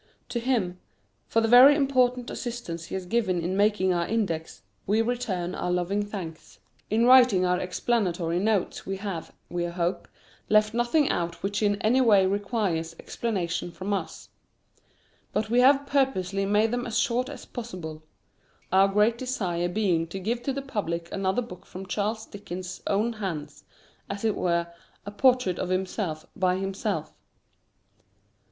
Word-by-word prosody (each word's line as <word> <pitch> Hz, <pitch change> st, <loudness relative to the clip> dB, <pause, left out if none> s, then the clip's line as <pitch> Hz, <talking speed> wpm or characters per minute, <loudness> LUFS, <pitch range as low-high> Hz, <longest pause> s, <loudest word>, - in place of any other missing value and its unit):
To 240 Hz, -, -2 dB
him, 225 Hz, -8 st, 0 dB, 0.5 s
for 225 Hz, -, +2 dB
the 225 Hz, -, +2 dB
very 255 Hz, +5 st, +9 dB
important 255 Hz, -4 st, +1 dB
assistance 230 Hz, -9 st, -5 dB
he -, -, -6 dB
has 190 Hz, -1 st, -4 dB
given 190 Hz, -3 st, 0 dB
in 175 Hz, +3 st, -2 dB
making 200 Hz, -2 st, +2 dB
our 170 Hz, -1 st, 0 dB
Index, 180 Hz, -, -2 dB, 0.2 s
we 210 Hz, +3 st, +2 dB
return 205 Hz, -7 st, -2 dB
our 180 Hz, -, -3 dB
loving 180 Hz, +3 st, 0 dB
thanks. 185 Hz, -6 st, -8 dB, 0.3 s
In 225 Hz, +3 st, +3 dB
writing 245 Hz, -7 st, +6 dB
our 180 Hz, 0 st, +2 dB
explanatory 180 Hz, -3 st, 0 dB
notes 205 Hz, -1 st, 0 dB
we 195 Hz, 0 st, -4 dB
have, 190 Hz, -4 st, -5 dB, 0.2 s
we 175 Hz, 0 st, -2 dB
hope, 175 Hz, +1 st, -2 dB, 0.4 s
left 215 Hz, 0 st, +4 dB
nothing 240 Hz, +5 st, +2 dB
out 170 Hz, -1 st, -3 dB
which 205 Hz, +2 st, -1 dB
in 205 Hz, -1 st, +2 dB
any 245 Hz, +5 st, +4 dB
way 205 Hz, -6 st, +5 dB
requires 195 Hz, -5 st, -1 dB
explanation 180 Hz, -7 st, -3 dB
from 190 Hz, +4 st, -4 dB
us. 185 Hz, -5 st, -4 dB, 1.0 s
But 215 Hz, +1 st, -1 dB
we 240 Hz, -, +4 dB
have 275 Hz, +2 st, +5 dB
purposely 195 Hz, -9 st, 0 dB
made 210 Hz, +2 st, +3 dB
them 245 Hz, +1 st, -2 dB
as 230 Hz, 0 st, -2 dB
short 245 Hz, +2 st, +1 dB
as 285 Hz, -, -9 dB
possible; 180 Hz, -10 st, -7 dB, 0.7 s
our 190 Hz, +1 st, +6 dB
great 210 Hz, +4 st, +2 dB
desire 180 Hz, -9 st, -1 dB
being 175 Hz, -4 st, +1 dB
to 190 Hz, +4 st, -6 dB
give 230 Hz, +5 st, -2 dB
to 275 Hz, -, -2 dB
the 275 Hz, +1 st, -4 dB
public 170 Hz, -10 st, -3 dB
another 195 Hz, +5 st, 0 dB
book 185 Hz, -6 st, -11 dB
from 190 Hz, +1 st, -9 dB
Charles 215 Hz, +3 st, -2 dB
Dickens's 185 Hz, -2 st, -7 dB
own 215 Hz, +4 st, +1 dB
hands 165 Hz, -9 st, -6 dB, 0.4 s
as 200 Hz, +2 st, -4 dB
it 220 Hz, -, +3 dB
were, 170 Hz, -1 st, +1 dB, 0.4 s
a 205 Hz, -, -6 dB
portrait 250 Hz, -4 st, +2 dB
of 180 Hz, -, -2 dB
himself 185 Hz, -3 st, -2 dB
by 185 Hz, -1 st, +2 dB
himself. 195 Hz, +1 st, -3 dB
200 Hz, 155 wpm, -26 LUFS, 180-235 Hz, 1.0 s, very